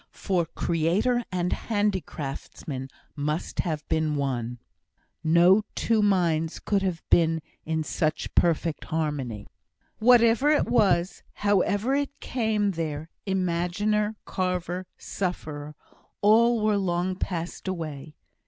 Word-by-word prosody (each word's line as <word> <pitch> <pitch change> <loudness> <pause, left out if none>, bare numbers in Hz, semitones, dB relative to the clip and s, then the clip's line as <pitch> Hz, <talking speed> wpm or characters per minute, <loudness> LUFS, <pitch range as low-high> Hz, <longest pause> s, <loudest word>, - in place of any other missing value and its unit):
for 180 -4 0
creator 175 +11 +1
and 180 -1 -1
handicraftsman 160 - -3 0.3
must 150 +3 -3
have 155 -4 -2
been 155 -1 +1
one; 125 -4 -2 0.7
no 170 +5 +5
two 225 -2 +2
minds 170 -5 +2
could 200 -2 0
have 185 -4 -2
been 165 -1 +4 0.3
in 160 0 -1
such 155 0 -2
perfect 165 -2 +1
harmony. 145 -9 -2 0.5
Whatever 235 +3 +5
it 300 - +3
was 195 -6 +2
however 205 +4 +1
it 285 0 -1
came 220 -4 0
there 160 -2 -4 0.2
imaginer, 190 +4 0
carver, 180 0 -2
sufferer, 150 -5 -4 0.5
all 230 +2 +5
were 215 -1 +3
long 185 -1 0
passed 175 0 -4
away. 155 -5 -5
175 Hz, 105 wpm, -26 LUFS, 155-205 Hz, 0.7 s, no